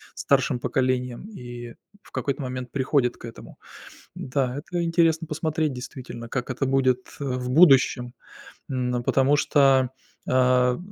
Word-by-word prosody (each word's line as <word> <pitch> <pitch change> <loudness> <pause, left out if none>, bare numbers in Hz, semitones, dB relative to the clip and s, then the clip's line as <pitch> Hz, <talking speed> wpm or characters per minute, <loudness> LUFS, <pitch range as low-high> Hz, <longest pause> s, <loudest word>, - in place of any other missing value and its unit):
старшим 135 -1 +1
поколением 125 - -1
и 120 - -9 0.3
в - - -19
какой-то 140 0 -2
момент 130 -2 -5
приходят 130 -2 +1
к - - -18
этому. 115 - -11 0.6
Да, 130 -1 -2
это 170 +4 -3
интересно 165 -1 +2
посмотреть, 155 -1 -1
действительно, 125 -2 -8
как 125 +1 -4
это 130 +2 -2
будет, 130 -1 +1
э, - - -4
в 125 -2 -3
будущем, 135 -5 +5 0.6
м, 125 -2 -1
потому 135 +3 +3
что, 135 -4 +3 0.4
а, 125 -1 +3
130 Hz, 130 wpm, -24 LUFS, 125-145 Hz, 0.6 s, будущем